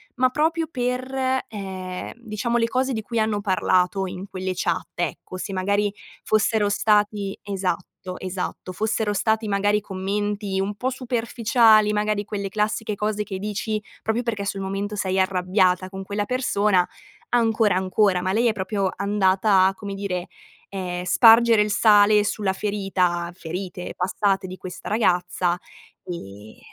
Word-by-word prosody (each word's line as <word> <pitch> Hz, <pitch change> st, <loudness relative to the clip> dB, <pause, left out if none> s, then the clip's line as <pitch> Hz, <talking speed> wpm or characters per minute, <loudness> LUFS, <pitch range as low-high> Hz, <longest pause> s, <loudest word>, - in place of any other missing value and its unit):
ma 255 Hz, 0 st, +3 dB
proprio 320 Hz, +4 st, 0 dB
per, 260 Hz, +1 st, -1 dB
ehm, 190 Hz, -3 st, -6 dB
diciamo 235 Hz, 0 st, -2 dB
le 230 Hz, -1 st, +2 dB
cose 260 Hz, +2 st, 0 dB
di 220 Hz, -, -2 dB
cui 230 Hz, +2 st, -3 dB
hanno 215 Hz, -1 st, 0 dB
parlato 185 Hz, 0 st, +1 dB
in 185 Hz, +1 st, -6 dB
quelle 185 Hz, 0 st, -3 dB
chat, 175 Hz, -1 st, -1 dB
ecco. 175 Hz, +2 st, -4 dB
Se 195 Hz, +2 st, -5 dB
magari 200 Hz, +2 st, 0 dB, 0.3 s
fossero 215 Hz, 0 st, +2 dB
stati 205 Hz, -1 st, +1 dB
esatto, 185 Hz, -2 st, -4 dB
esatto, 185 Hz, 0 st, -5 dB
fossero 215 Hz, +1 st, 0 dB
stati 220 Hz, +2 st, +1 dB
magari 205 Hz, +1 st, +2 dB
commenti 200 Hz, 0 st, -2 dB
un 200 Hz, +2 st, -2 dB
po' 250 Hz, +5 st, -1 dB
superficiali, 230 Hz, -3 st, +3 dB
magari 210 Hz, 0 st, 0 dB
quelle 200 Hz, -2 st, -4 dB
classiche 210 Hz, +1 st, -1 dB
cose 210 Hz, +1 st, -1 dB
che 195 Hz, -3 st, -6 dB
dici 210 Hz, +1 st, -2 dB, 0.2 s
proprio 220 Hz, +2 st, 0 dB
perché 215 Hz, -4 st, -2 dB
sul 195 Hz, 0 st, -3 dB
momento 195 Hz, +2 st, -3 dB
sei 190 Hz, -1 st, 0 dB
arrabbiata 185 Hz, 0 st, +2 dB
con 190 Hz, 0 st, -7 dB
quella 205 Hz, +1 st, -2 dB
persona, 205 Hz, -7 st, +2 dB, 0.4 s
ancora 225 Hz, -4 st, +2 dB
ancora, 190 Hz, 0 st, +2 dB
ma 185 Hz, +1 st, -1 dB
lei 235 Hz, +3 st, +3 dB
è 225 Hz, -, +2 dB
proprio 195 Hz, -1 st, -1 dB
andata 195 Hz, -1 st, +3 dB
a, 195 Hz, -, 0 dB
come 200 Hz, 0 st, -6 dB
dire, 190 Hz, -3 st, -3 dB, 0.4 s
ehm, 180 Hz, -2 st, -4 dB
spargere 225 Hz, +4 st, +6 dB
il 210 Hz, -, -3 dB
sale 210 Hz, 0 st, +5 dB
sulla 205 Hz, -2 st, -1 dB
ferita 190 Hz, -4 st, -1 dB
ferite 180 Hz, +2 st, -6 dB
passate 195 Hz, +1 st, 0 dB
di 185 Hz, +1 st, -8 dB
questa 185 Hz, -1 st, -8 dB
ragazza 180 Hz, -4 st, +1 dB, 0.5 s
e 105 Hz, -, -9 dB
205 Hz, 145 wpm, -23 LUFS, 185-220 Hz, 0.5 s, spargere